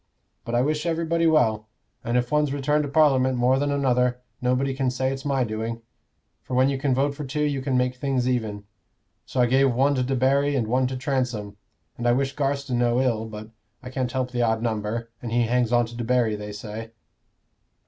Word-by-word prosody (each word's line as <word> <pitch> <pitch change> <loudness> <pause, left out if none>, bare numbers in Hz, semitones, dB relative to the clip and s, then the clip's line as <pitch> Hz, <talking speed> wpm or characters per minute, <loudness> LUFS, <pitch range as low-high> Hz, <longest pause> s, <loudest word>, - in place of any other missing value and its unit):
But 120 0 -2
I 120 - +3
wish 150 +3 -1
everybody 165 0 +1
well; 110 -9 +2 0.4
and 120 +1 0
if 125 0 -1
one's 150 -2 +2
returned 145 +2 +1
to - - -5
Parliament 135 -4 +3
more 125 +2 +3
than 145 0 0
another, 125 -3 +1 0.2
nobody 125 +2 +1
can 130 -1 0
say 130 +1 -1
it's 135 +1 -8
my 135 -2 +1
doing; 115 +1 -4 0.6
for 125 - -5
when 130 +2 +4
you 135 -1 -2
can 135 -2 +1
vote 140 +2 +1
for 150 - -6
two, 150 +2 -2
you 145 -2 0
can 130 -1 0
make 125 0 +1
things 130 -2 0
even. 110 -5 -1 0.6
So 125 - 0
I - - +5
gave 135 +2 +3
one 135 +3 +3
to 130 -2 0
Debarry 135 +2 +2
and 120 -4 +1
one 125 +3 +1
to 130 0 -4
Transome; 125 -7 -2 0.4
and 120 - -1
I 120 - +5
wish 135 +2 -1
Garstin 140 -3 -1
no 120 0 +2
ill, 115 -4 0
but 110 0 -9 0.3
I 125 - -8
can't 130 -2 -2
help 130 -1 -2
the 120 -1 -1
odd 115 -1 +1
number, 115 +1 -2
and 120 - -5
he 120 +1 +2
hangs 120 0 +1
on 120 0 +3
to 115 +1 -10
Debarry, 120 -2 +1
they 105 0 -7
say." 110 +2 -7
125 Hz, 210 wpm, -24 LUFS, 120-135 Hz, 0.6 s, I